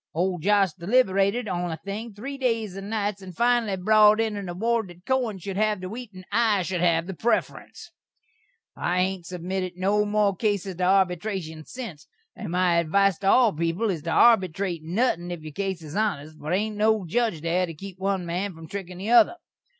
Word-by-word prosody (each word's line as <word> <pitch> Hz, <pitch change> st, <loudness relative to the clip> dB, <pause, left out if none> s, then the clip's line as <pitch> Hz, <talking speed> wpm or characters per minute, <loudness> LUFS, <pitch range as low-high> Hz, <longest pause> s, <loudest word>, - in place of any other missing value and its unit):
Old 180 Hz, 0 st, 0 dB
Josh 195 Hz, -2 st, +3 dB
deliberated 200 Hz, +3 st, +1 dB
on 180 Hz, -2 st, -2 dB
the 160 Hz, -, -4 dB
thing 200 Hz, +7 st, -6 dB
three 270 Hz, +7 st, -6 dB
days 230 Hz, -7 st, -1 dB
and 195 Hz, +1 st, -7 dB
nites, 205 Hz, -2 st, -2 dB
and 185 Hz, -3 st, -11 dB
finally 235 Hz, -4 st, +2 dB
brot 215 Hz, +2 st, +5 dB
in 220 Hz, -2 st, 0 dB
an 200 Hz, -3 st, -5 dB
award 225 Hz, +4 st, 0 dB
that 175 Hz, 0 st, -15 dB
Kohen 250 Hz, -6 st, 0 dB
should 190 Hz, +1 st, -6 dB
hav 215 Hz, -1 st, +1 dB
the 185 Hz, 0 st, -6 dB
wheat 240 Hz, +2 st, -7 dB
an' 185 Hz, 0 st, -11 dB
I 215 Hz, -3 st, +2 dB
should 180 Hz, -1 st, -2 dB
hav 165 Hz, -1 st, +2 dB
the 190 Hz, -, -5 dB
prefferense. 240 Hz, -, -2 dB, 0.8 s
I 175 Hz, +1 st, -1 dB
hain't 185 Hz, -2 st, -3 dB
submitted 185 Hz, +1 st, -4 dB
no 200 Hz, +3 st, +2 dB
more 205 Hz, -1 st, +1 dB
cases 200 Hz, -2 st, -1 dB
to 180 Hz, -, 0 dB
arbytration 180 Hz, -3 st, 0 dB
sinse, 185 Hz, -, -8 dB, 0.3 s
and -, -, -6 dB
my 180 Hz, -1 st, +2 dB
advise 190 Hz, +3 st, +2 dB
to 195 Hz, -, -2 dB
all 230 Hz, 0 st, +5 dB
peepul 170 Hz, +7 st, 0 dB
is 165 Hz, -5 st, -4 dB
to 165 Hz, -, -5 dB
arbytrate 190 Hz, -6 st, +3 dB
nuthin' 175 Hz, +1 st, 0 dB
if 175 Hz, -2 st, -5 dB
your 155 Hz, -1 st, -8 dB
case 190 Hz, -1 st, -3 dB
is 155 Hz, 0 st, -8 dB
honest, 155 Hz, -8 st, -1 dB
for -, -, -13 dB
there 155 Hz, -, -1 dB
ain't 210 Hz, +2 st, -1 dB
no 215 Hz, -2 st, +2 dB
judge 220 Hz, -2 st, 0 dB
there 175 Hz, +3 st, 0 dB
to 165 Hz, -, -7 dB
keep 190 Hz, +3 st, -10 dB
one 190 Hz, -2 st, -1 dB
man 180 Hz, +2 st, -3 dB
from 160 Hz, 0 st, -11 dB
trikkin' 185 Hz, -2 st, -7 dB
the 200 Hz, +5 st, -3 dB
other. 240 Hz, +8 st, +6 dB
195 Hz, 200 wpm, -25 LUFS, 175-215 Hz, 0.8 s, other